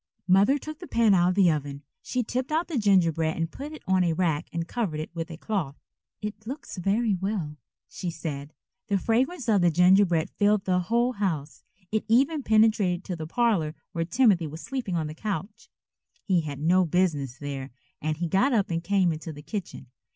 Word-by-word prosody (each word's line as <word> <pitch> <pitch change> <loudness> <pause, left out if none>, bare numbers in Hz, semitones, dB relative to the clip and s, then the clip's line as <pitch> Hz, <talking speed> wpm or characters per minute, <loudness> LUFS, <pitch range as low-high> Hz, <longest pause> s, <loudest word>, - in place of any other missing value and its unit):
Mother 200 +9 +5
took 310 +2 -8
the 355 - -9
pan 230 -3 +3
out 175 -1 +4
of 180 - 0
the 190 -4 +5
oven. 145 -1 -4 0.2
She 250 -1 -2
tipped 255 +5 -3
out 320 +3 +1
the 305 -7 -1
gingerbread 165 -6 +2
and 165 0 -2
put 290 +2 -7
it 310 - -10
on 190 -1 +3
a 170 -2 +1
rack 160 -2 0
and 165 0 -3
covered 190 -10 -2
it 155 - -5
with 165 -1 -4
a 165 - -8
cloth. 175 -8 -3 0.5
"It 210 +1 -6
looks 275 -4 -7
very 205 +4 +1
well," 185 -5 -3 0.3
she 180 - -5
said. 150 -3 -5 0.4
The 200 -2 +2
fragrance 250 - 0
of 210 -4 +4
that 170 -3 +3
gingerbread 180 -2 +4
filled 205 -1 +2
the 185 -1 +2
whole 235 +7 +1
house. 170 - -3 0.3
It 220 0 0
even 275 +7 +3
penetrated 215 -6 +3
to 180 - -4
the 160 -2 -6
parlor 185 -7 +1 0.2
where 165 - -1
Timothy 180 -2 +3
was 155 +2 -8
sleeping 250 -9 -3
on 160 -2 0
the 150 - -5
couch. 205 +5 -5 0.5
He 185 -4 +2
had 145 -3 -6
no 180 +5 +4
business 155 -7 0
there 140 -2 -5 0.3
and 155 0 -1
he 170 +1 -2
got 195 - +2
up 205 -6 +1
and 165 0 -1
came 190 -2 +2
into 160 +1 -7
the 145 -1 -11
kitchen. 195 - -6
185 Hz, 200 wpm, -26 LUFS, 160-220 Hz, 0.5 s, Mother